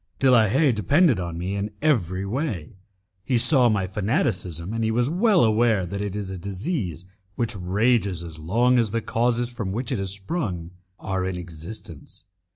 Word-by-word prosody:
De 135 Hz, -1 st, +4 dB
la 115 Hz, -3 st, +6 dB
Haye 135 Hz, +7 st, +3 dB
depended 130 Hz, -, +3 dB
on 85 Hz, -2 st, -4 dB
me 90 Hz, +3 st, -3 dB
in 100 Hz, +1 st, -2 dB
every 100 Hz, -, +1 dB
way; 105 Hz, -, -3 dB, 0.5 s
he 125 Hz, +3 st, +1 dB
saw 125 Hz, 0 st, +5 dB
my 100 Hz, -4 st, +1 dB
fanaticism, 95 Hz, -, -1 dB
and 115 Hz, 0 st, -1 dB
he 110 Hz, -, +1 dB
was 120 Hz, +5 st, +1 dB
well 195 Hz, +1 st, +4 dB
aware 110 Hz, -3 st, +3 dB
that 100 Hz, +3 st, -5 dB
it 100 Hz, -1 st, -3 dB
is 100 Hz, -2 st, -4 dB
a 95 Hz, -, -6 dB
disease 95 Hz, -, -3 dB, 0.3 s
which 115 Hz, -2 st, -2 dB
rages 100 Hz, 0 st, +1 dB
as 80 Hz, -2 st, -8 dB
long 120 Hz, +10 st, +2 dB
as 115 Hz, -3 st, +1 dB
the 115 Hz, +3 st, -1 dB
causes 120 Hz, +1 st, 0 dB
from 115 Hz, -6 st, -4 dB
which 120 Hz, +5 st, -3 dB
it 125 Hz, -, -1 dB
has 95 Hz, -1 st, -2 dB
sprung 95 Hz, -, -3 dB, 0.3 s
are 95 Hz, -1 st, -2 dB
in 95 Hz, -1 st, -2 dB
existence. 85 Hz, -1 st, -9 dB
105 Hz, 180 wpm, -24 LUFS, 95-120 Hz, 0.5 s, la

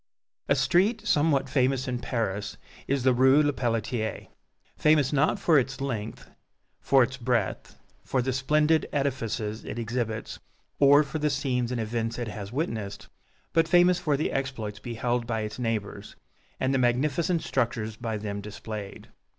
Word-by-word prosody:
A -, -, +5 dB
street 205 Hz, +6 st, +2 dB
somewhat 145 Hz, -3 st, +2 dB
famous 130 Hz, 0 st, +1 dB
in 125 Hz, -1 st, -2 dB
Paris 105 Hz, -5 st, -3 dB, 0.3 s
is 140 Hz, -2 st, 0 dB
the 130 Hz, -1 st, +4 dB
Rue 130 Hz, +4 st, +5 dB
Lepelletier, 115 Hz, -5 st, -2 dB, 0.5 s
famous 150 Hz, -3 st, +3 dB
not 145 Hz, +6 st, +2 dB
for 165 Hz, -6 st, +4 dB
its 135 Hz, +1 st, -3 dB
length, 115 Hz, -6 st, -4 dB, 0.5 s
for 135 Hz, -2 st, +4 dB
its 130 Hz, +2 st, -3 dB
breadth, 120 Hz, -5 st, -2 dB, 0.3 s
for 130 Hz, -, -1 dB
the 130 Hz, +1 st, -1 dB
splendid 150 Hz, +4 st, +2 dB
edifices 115 Hz, -6 st, -2 dB
it -, -, -6 dB
exhibits, 115 Hz, -1 st, -3 dB, 0.4 s
or 145 Hz, +1 st, +7 dB
for 145 Hz, +2 st, -5 dB
the 150 Hz, 0 st, +1 dB
scenes 130 Hz, -4 st, -1 dB
and 125 Hz, -, -2 dB
events 115 Hz, +1 st, -2 dB
it 120 Hz, -3 st, -3 dB
has 100 Hz, -1 st, -7 dB
witnessed, 115 Hz, -8 st, -4 dB, 0.4 s
but 165 Hz, 0 st, +3 dB
famous 175 Hz, +1 st, +5 dB
for 150 Hz, -5 st, 0 dB
the 155 Hz, -, -1 dB
exploits 120 Hz, -6 st, -3 dB
beheld 120 Hz, +1 st, -2 dB
by 115 Hz, -2 st, -1 dB
its 105 Hz, +3 st, -5 dB
neighbors, 115 Hz, -4 st, -3 dB, 0.4 s
and 130 Hz, +1 st, +1 dB
the 135 Hz, -, +2 dB
magnificent 150 Hz, +7 st, +1 dB
structures 115 Hz, -4 st, -1 dB
by 115 Hz, -1 st, -3 dB
them 100 Hz, -1 st, -4 dB
displayed. 105 Hz, -1 st, -8 dB
125 Hz, 150 wpm, -27 LUFS, 115-140 Hz, 0.5 s, or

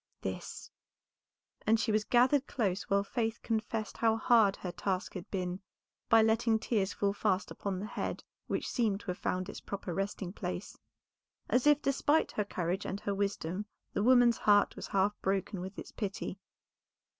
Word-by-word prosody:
"This," -, -, -6 dB, 1.0 s
and 225 Hz, +1 st, +5 dB
she 220 Hz, -, +1 dB
was 215 Hz, 0 st, +2 dB
gathered 255 Hz, +3 st, +4 dB
close 195 Hz, -6 st, -1 dB
while 200 Hz, 0 st, +3 dB
Faith 225 Hz, +2 st, -2 dB
confessed 220 Hz, -1 st, -2 dB
how 225 Hz, -1 st, +3 dB
hard 220 Hz, -3 st, +4 dB
her 180 Hz, -, -5 dB
task 185 Hz, +1 st, -2 dB
had 180 Hz, -3 st, -7 dB
been 180 Hz, -1 st, -2 dB, 0.5 s
by 225 Hz, -2 st, +7 dB
letting 225 Hz, 0 st, +3 dB
tears 210 Hz, -3 st, 0 dB
fall 200 Hz, -1 st, 0 dB
fast 205 Hz, -2 st, 0 dB
upon 195 Hz, -2 st, -3 dB
the 200 Hz, -, -4 dB
head 215 Hz, -, -4 dB, 0.2 s
which -, -, -2 dB
seemed 215 Hz, -5 st, 0 dB
to 185 Hz, -, -3 dB
have 180 Hz, -, -7 dB
found 185 Hz, 0 st, -1 dB
its -, -, -7 dB
proper 195 Hz, -3 st, -5 dB
resting 195 Hz, 0 st, -3 dB
place, 180 Hz, -1 st, -5 dB, 0.8 s
as 250 Hz, +3 st, +3 dB
if 295 Hz, 0 st, +5 dB
despite 290 Hz, +3 st, +2 dB
her 210 Hz, -, 0 dB
courage 185 Hz, -1 st, -2 dB
and 200 Hz, +2 st, -4 dB
her 200 Hz, -, -1 dB
wisdom 200 Hz, -1 st, -2 dB, 0.3 s
the -, -, 0 dB
woman's 245 Hz, 0 st, +5 dB
heart 205 Hz, -1 st, +4 dB
was -, -, -6 dB
half 195 Hz, +1 st, +2 dB
broken 195 Hz, 0 st, -1 dB
with 190 Hz, +2 st, -7 dB
its -, -, -8 dB
pity. 200 Hz, -2 st, -4 dB
205 Hz, 170 wpm, -32 LUFS, 190-225 Hz, 1.0 s, by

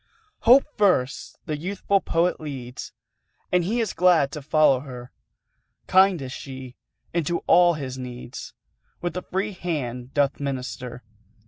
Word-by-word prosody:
Hope 255 Hz, +4 st, +7 dB, 0.2 s
first 165 Hz, -11 st, +1 dB
the 155 Hz, -, -2 dB
youthful 195 Hz, +4 st, 0 dB
Poet 170 Hz, +2 st, +1 dB
leads, 130 Hz, -5 st, -7 dB, 0.6 s
And 180 Hz, -1 st, +3 dB
he 220 Hz, +7 st, 0 dB
is 225 Hz, -4 st, -1 dB
glad 170 Hz, -6 st, +4 dB
to 150 Hz, -, -6 dB
follow 150 Hz, -2 st, +4 dB
her; 125 Hz, -2 st, -9 dB, 0.7 s
Kind 190 Hz, -4 st, +4 dB
is 130 Hz, -, -6 dB
she, 130 Hz, -2 st, -8 dB, 0.4 s
and 170 Hz, -1 st, +1 dB
to 170 Hz, -, -1 dB
all 175 Hz, -1 st, +5 dB
his 130 Hz, -3 st, -5 dB
needs 125 Hz, -1 st, -8 dB, 0.4 s
With 175 Hz, 0 st, -3 dB
a 180 Hz, -, -2 dB
free 195 Hz, +4 st, -2 dB
hand 135 Hz, -9 st, -4 dB
doth 145 Hz, -2 st, +2 dB
minister. 130 Hz, -3 st, -5 dB
150 Hz, 140 wpm, -24 LUFS, 130-180 Hz, 0.7 s, Hope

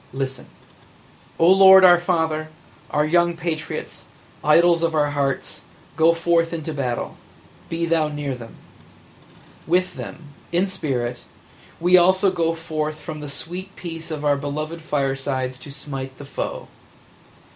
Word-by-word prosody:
Listen! 135 Hz, -1 st, -4 dB, 0.9 s
"O 165 Hz, -, +4 dB
Lord 190 Hz, 0 st, +8 dB
our 175 Hz, -1 st, +7 dB
Father, 160 Hz, -3 st, -1 dB, 0.4 s
our 150 Hz, 0 st, +1 dB
young 170 Hz, +1 st, +2 dB
patriots, 165 Hz, -2 st, -5 dB, 0.4 s
idols 170 Hz, +2 st, +5 dB
of 165 Hz, -1 st, 0 dB
our 145 Hz, -1 st, +2 dB
hearts, 140 Hz, -2 st, -2 dB, 0.3 s
go 165 Hz, +1 st, +4 dB
forth 165 Hz, 0 st, +2 dB
to 160 Hz, -, -4 dB
battle 125 Hz, -4 st, -3 dB, 0.3 s
– -, -, -26 dB
be 165 Hz, 0 st, -1 dB
Thou 165 Hz, -2 st, +2 dB
near 145 Hz, -2 st, -4 dB
them! 120 Hz, -2 st, -10 dB, 1.1 s
With 180 Hz, +2 st, +1 dB
them 160 Hz, -3 st, -8 dB
– -, -, -26 dB
in 175 Hz, +2 st, +2 dB
spirit 130 Hz, -10 st, -3 dB, 0.3 s
– -, -, -25 dB
we 180 Hz, +2 st, +5 dB
also 185 Hz, +2 st, +4 dB
go 165 Hz, -2 st, 0 dB
forth 155 Hz, -2 st, -4 dB
from 155 Hz, 0 st, -7 dB
the 150 Hz, -1 st, -7 dB
sweet 180 Hz, +7 st, -7 dB
peace 165 Hz, -1 st, -7 dB
of 150 Hz, -2 st, -4 dB
our 145 Hz, -1 st, +3 dB
beloved 155 Hz, +3 st, -4 dB
firesides 135 Hz, -3 st, -2 dB
to 145 Hz, -, -10 dB
smite 135 Hz, -2 st, -7 dB
the 145 Hz, -, -10 dB
foe. -, -, -5 dB
155 Hz, 145 wpm, -22 LUFS, 145-170 Hz, 1.1 s, Lord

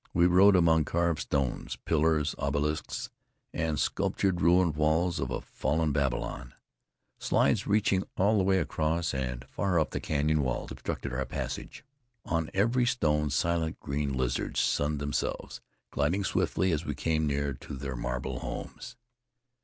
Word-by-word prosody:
We 85 Hz, 0 st, +5 dB
rode 95 Hz, +3 st, +6 dB
among 80 Hz, -3 st, +4 dB
carved 85 Hz, 0 st, 0 dB
stones, 70 Hz, -4 st, -2 dB
pillars, 80 Hz, -1 st, +2 dB
obelisks 75 Hz, +2 st, -2 dB, 0.4 s
and 80 Hz, -2 st, -1 dB
sculptured 95 Hz, -3 st, 0 dB
ruined 85 Hz, -1 st, +4 dB
walls 80 Hz, +3 st, +1 dB
of 65 Hz, -, -2 dB
a 65 Hz, -, -3 dB
fallen 80 Hz, 0 st, -1 dB
Babylon. 65 Hz, -3 st, -2 dB, 0.6 s
Slides -, -, +2 dB
reaching 100 Hz, -2 st, +2 dB, 0.2 s
all 105 Hz, +3 st, +3 dB
the -, -, +2 dB
way 95 Hz, 0 st, +3 dB
across 80 Hz, -1 st, 0 dB
and 65 Hz, -2 st, -3 dB
far 90 Hz, +5 st, 0 dB
up 80 Hz, -, 0 dB
the -, -, -2 dB
canyon 75 Hz, +1 st, +1 dB
wall 65 Hz, -3 st, -2 dB
obstructed -, -, -4 dB
our 65 Hz, +2 st, -1 dB
passage. -, -, -5 dB, 0.4 s
On 80 Hz, -1 st, -1 dB
every 115 Hz, +5 st, +2 dB
stone 75 Hz, -10 st, +1 dB
silent 80 Hz, +3 st, 0 dB
green 70 Hz, 0 st, -2 dB
lizards 65 Hz, -2 st, -1 dB
sunned 75 Hz, +1 st, +1 dB
themselves, 70 Hz, 0 st, -3 dB, 0.3 s
gliding 85 Hz, +9 st, 0 dB
swiftly 95 Hz, -1 st, +1 dB
as 80 Hz, 0 st, 0 dB
we 75 Hz, -3 st, -3 dB
came 80 Hz, +1 st, 0 dB
near 70 Hz, 0 st, -1 dB
to 65 Hz, -, -8 dB
their 70 Hz, 0 st, -5 dB
marble -, -, -3 dB
homes. -, -, -7 dB
75 Hz, 145 wpm, -29 LUFS, 70-85 Hz, 0.6 s, rode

